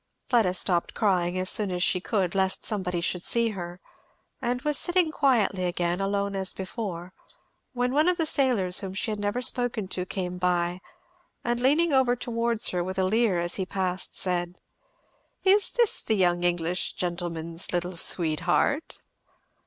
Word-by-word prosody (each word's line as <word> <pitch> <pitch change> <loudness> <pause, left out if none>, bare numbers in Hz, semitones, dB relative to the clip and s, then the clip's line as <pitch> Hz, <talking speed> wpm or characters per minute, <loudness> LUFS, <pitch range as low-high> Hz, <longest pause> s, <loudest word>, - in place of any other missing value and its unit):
Fleda 220 -7 +3
stopped 175 -2 0
crying 180 -4 +1
as 185 0 -1
soon 205 +1 +3
as 180 0 0
she 180 - +3
could, 190 -4 -1
lest 190 -1 0
somebody 180 -5 -2
should 180 0 0
see 235 +4 +2
her; 175 -3 -7 0.6
and 245 +1 -1
was 300 -1 0
sitting 350 +1 +1
quietly 230 -11 +2
again, 175 +1 -1
alone 200 0 -1
as 190 -1 -1
before, 185 -3 -6 0.6
when 250 0 -1
one 305 +5 +4
of 360 - +1
the 325 - +1
sailors 245 - +2
whom 190 -1 -6
she 215 - -2
had 210 - -4
never 205 +5 -2
spoken 245 -5 -1
to 185 - -2
came 180 -2 -4
by, 180 0 0 0.6
and 240 0 -1
leaning 295 +6 +3
over 260 -2 +3
towards 235 -1 +1
her 180 -1 -1
with 185 +2 -5
a 190 - +2
leer 210 -1 +2
as 175 0 -2
he 190 - -1
passed, 185 -1 -3
said, 175 -1 -1 0.9
"Is 395 +2 +5
this 475 -3 +1
the 220 - 0
young 175 -2 +2
English 175 0 0
gentleman's 170 -1 -3
little 175 0 -2
sweetheart?" 175 - 0
190 Hz, 165 wpm, -26 LUFS, 180-240 Hz, 0.9 s, Is